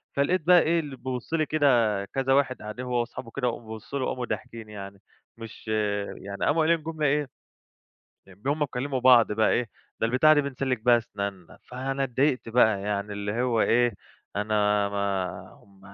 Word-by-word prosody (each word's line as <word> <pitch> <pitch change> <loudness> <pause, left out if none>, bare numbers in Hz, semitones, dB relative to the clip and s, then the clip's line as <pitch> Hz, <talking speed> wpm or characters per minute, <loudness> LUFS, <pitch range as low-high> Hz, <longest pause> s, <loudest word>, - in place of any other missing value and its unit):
فلقيت 160 +6 +2
بقى 180 -1 +8
إيه، 165 +1 +2
اللي 145 -4 -6
بيبُص 130 +2 -6
لي 155 -2 +2
كده 120 -10 +2
كذا 135 +4 0
واحد 135 -2 +1
قاعدين 110 +4 -6
هو 125 -1 0
واصحابه 120 0 -5
كده 125 -2 0
وقاموا 115 -2 -5
بصّوا 135 +6 -6
لي 130 - -1
وقاموا 125 -1 -3
ضاحكين 115 -3 -6
يعني. 100 -1 -9 0.4
مش 115 -1 -11 0.5
يعني 100 0 -4
قاموا 160 +3 +2
قايلين 165 -1 +2
جملة 160 -1 -3
إيه، 145 0 +1 1.0
إن 95 +3 -18
هم 145 +2 +1
بيكلّموا 135 -1 -2
بعض 120 -4 +6
بقى 110 +1 +2
إيه 120 -1 0 0.3
"ده 115 - +2
البتاعة 140 +6 +5
ديه 145 - +4
بنسلِّك 135 -3 -2
بيها 120 -1 +6
أسنانّا." 100 -5 -6
فأنا 135 +2 -3
اتضايقت 130 0 0
بقى 110 -4 +3
يعني 105 0 -2
اللي 105 +3 -3
هو 120 -3 +1
إيه، 120 0 +3 0.4
أنا 105 -1 +1
ما 100 -2 -3
هم 100 -1 -22
120 Hz, 175 wpm, -26 LUFS, 105-135 Hz, 1.0 s, بقى